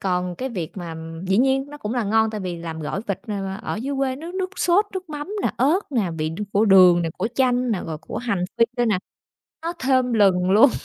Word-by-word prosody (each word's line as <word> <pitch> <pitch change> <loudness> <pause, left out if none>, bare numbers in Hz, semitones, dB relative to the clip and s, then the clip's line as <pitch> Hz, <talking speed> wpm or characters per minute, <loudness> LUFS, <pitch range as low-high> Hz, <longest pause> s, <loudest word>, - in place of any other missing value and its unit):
còn 180 -1 -1
cái 260 +5 -3
việc 180 -8 -5
mà 170 -3 -6 0.3
dĩ 195 - +3
nhiên 270 +1 +3
nó 295 - -9
cũng 210 0 -4
là 240 -3 0
ngon 220 +1 +2
tại 215 -2 -4
vì 180 -2 -4
làm 165 -1 -6
gỏi 155 +6 -3
vịt, 200 -3 -2
ờ, 210 - -2 0.3
ờ, - - -3
dưới 270 +6 -3
quê 265 -1 0
nước 335 +5 -8
nước 375 -1 -2
sốt, 370 +4 +3
nước 370 -2 -5
mắm 295 +3 -5
nè, - - +1
ớt 300 +10 +3
nè, 215 -10 0
vị 155 0 0
đ 165 - -7
của 210 +2 +3
đường 180 -3 +7
nè, 165 - -1
của 220 - 0
chanh 250 -1 +2
nè, 200 -5 0
rồi 155 -2 -4
của 160 - -8
hành 225 -7 -1
phi 230 - +7
nữa 240 - +2
nè, 210 -5 +2 0.6
nó 335 +1 -3
thơm 255 -2 +2
lừng 190 -4 +3
luôn. 220 +8 +7
220 Hz, 250 wpm, -23 LUFS, 180-265 Hz, 0.6 s, đường